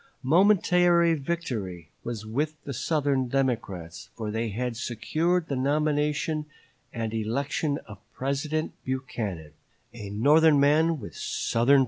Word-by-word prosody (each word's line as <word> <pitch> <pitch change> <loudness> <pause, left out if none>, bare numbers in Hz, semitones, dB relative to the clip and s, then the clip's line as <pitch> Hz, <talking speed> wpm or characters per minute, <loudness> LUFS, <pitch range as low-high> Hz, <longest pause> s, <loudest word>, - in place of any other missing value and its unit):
Momentary 175 +1 +4
victory 120 - -4
was 115 -3 -5
with 145 +8 -1
the 140 - -5
Southern 140 -1 0
Democrats, 95 -11 -2
for 110 -2 -4
they 115 +1 -1
had 120 +3 -3
secured 160 +9 0
the 140 - -2
nomination 150 +2 0 0.4
and 115 -2 -3
election 140 +6 -1
of 100 -3 -11 0.2
President 145 +4 -1
Buchanan 110 - -4 0.4
"a 105 -4 -7
Northern 145 +8 +5
man 155 +3 +3
with 105 - -9
Southern 115 +1 -1
principles." - - +7
135 Hz, 120 wpm, -27 LUFS, 110-155 Hz, 0.4 s, principles